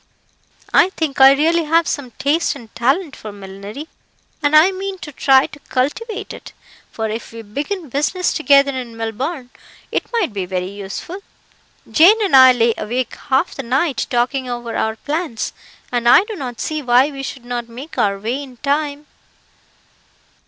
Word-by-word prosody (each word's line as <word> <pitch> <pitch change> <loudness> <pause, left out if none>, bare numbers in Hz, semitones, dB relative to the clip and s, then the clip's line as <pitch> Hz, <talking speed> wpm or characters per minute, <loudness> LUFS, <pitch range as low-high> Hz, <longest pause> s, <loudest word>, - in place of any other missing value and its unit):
I 365 - +6
think 315 -7 -2
I 270 +1 +9
really 325 +4 +2
have 330 +2 +3
some 280 -4 -3
taste 305 +3 +1
and 235 -5 -13
talent 275 +6 0
for 215 - -8
millinery, 200 +8 -9 0.5
and 290 0 +2
I 320 +5 +7
mean 385 0 -5
to 320 -4 -9
try 270 0 +4
to 290 - -11
cultivate 405 - -2
it; - - -11 0.4
for 220 -1 -3
if 220 +2 -5
we 225 0 -9
begin 295 - -4
business 300 +7 0
together 280 -3 +4
in 245 -4 -6
Melbourne, 250 +5 -4 0.4
it - - -1
may 465 -5 +1
be 200 - -5
very 185 0 -3
useful. 200 - -7 0.7
Jane 380 +8 +6
and 370 - +3
I 260 -1 +9
lay 235 -2 +2
awake 240 +3 -2 0.2
half 270 +6 +2
the - - -5
night, 270 +4 0
talking 255 +1 0
over 240 -1 -5
our 220 0 -1
plans, 295 -1 -3 0.4
and 240 -1 +2
I 365 - +7
do 430 +1 -7
not 250 -8 -6
see 310 -1 -2
why 255 +2 +3
we 275 -1 -7
should 265 -2 -7
not 240 -1 -4
make 260 +7 -8
our 200 -1 +2
way 235 +7 -3
in 260 -3 -11
time." 285 +2 -1
270 Hz, 170 wpm, -19 LUFS, 235-310 Hz, 0.7 s, I